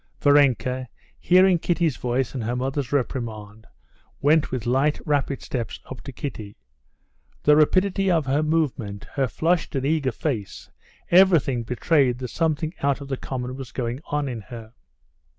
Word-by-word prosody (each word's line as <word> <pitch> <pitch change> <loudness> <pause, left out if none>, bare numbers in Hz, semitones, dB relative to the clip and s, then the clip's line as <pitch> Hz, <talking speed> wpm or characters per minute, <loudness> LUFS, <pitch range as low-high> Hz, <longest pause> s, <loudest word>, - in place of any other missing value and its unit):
Varenka, 130 -3 +3 0.3
hearing 185 0 +5
Kitty's 170 -4 0
voice 125 0 -1
and 125 -4 -4
her 120 +3 -2
mother's 135 +1 -2
reprimand, 110 -5 -3 0.5
went 155 +2 +3
with 125 -4 -4
light, 135 +5 +1
rapid 145 -3 -1
steps 120 -3 -4
up 130 - -7
to 135 - -8
Kitty. 110 -6 -7 0.9
The 150 - +6
rapidity 185 +5 +3
of 165 -5 +2
her 135 +3 +1
movement, 145 -11 -1
her 135 -3 +1
flushed 165 +6 0
and 135 0 -1
eager 145 -3 +1
face, 115 - -4 0.4
everything 170 -9 +5
betrayed 125 +2 +1
that 125 -1 -5
something 160 +1 -1
out 140 0 +1
of 140 -1 -9
the 135 - -2
common 125 -1 -5
was 130 -4 -8
going 120 0 -3
on 145 -1 -1
in 120 -4 -5
her. 115 -1 -11
135 Hz, 150 wpm, -24 LUFS, 125-155 Hz, 0.9 s, The